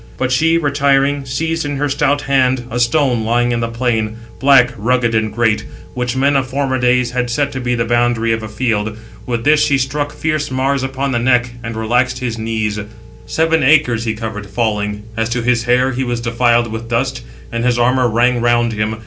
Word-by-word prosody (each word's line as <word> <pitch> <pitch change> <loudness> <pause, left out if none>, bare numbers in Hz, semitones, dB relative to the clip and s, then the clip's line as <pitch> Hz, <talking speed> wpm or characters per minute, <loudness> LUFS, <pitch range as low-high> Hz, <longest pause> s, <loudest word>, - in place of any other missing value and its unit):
But 130 0 -1
she, 165 +6 +3
retiring, 140 -2 +1
seized 165 +5 -2
in 145 -1 -3
her 145 +1 0
stout 145 0 +1
hand 130 -3 +1
a 120 - -2
stone 120 -1 +2
lying 120 +2 +1
in 120 - 0
the 115 - -1
plain, 115 -2 -1 0.2
black, 135 -2 +5
rugged, 120 +1 0
and 110 -1 0
great, 110 -1 +1 0.3
which 125 0 -2
men 140 +2 +2
of 135 -1 +1
former 130 0 -1
days 125 0 +2
had 125 -1 -1
set 140 +4 0
to 130 - -5
be 125 0 0
the 115 -1 -1
boundary 120 -1 +1
of 110 - -2
a 110 - -6
field. 110 -1 -1 0.4
684 - - -5
With 115 -1 -1
this 150 0 +4
she 140 -2 +2
struck 145 +3 -2
fierce 155 -1 -2
Mars 130 +1 0
upon 135 +1 -2
the 120 - 0
neck, 125 0 +2
and 115 -1 -5
relaxed 120 +4 0
his 120 -3 -4
knees. 110 -2 -2 0.5
Seven 160 0 +1
acres 130 -5 +3
he 110 -1 -1
covered, 110 -2 -6
falling; 105 -1 -2
as 115 +1 -1
to 120 0 -2
his 120 -1 +1
hair 125 +2 +2
he 130 +1 -2
was 120 -2 -2
defiled 120 0 +1
with 115 +1 -6
dust; 130 +2 -1 0.3
and 115 0 -2
his 125 -1 +2
armour 125 +1 +2
rang 120 +2 +2
round 120 -1 +2
him. 105 +1 -2
125 Hz, 210 wpm, -16 LUFS, 115-135 Hz, 0.5 s, black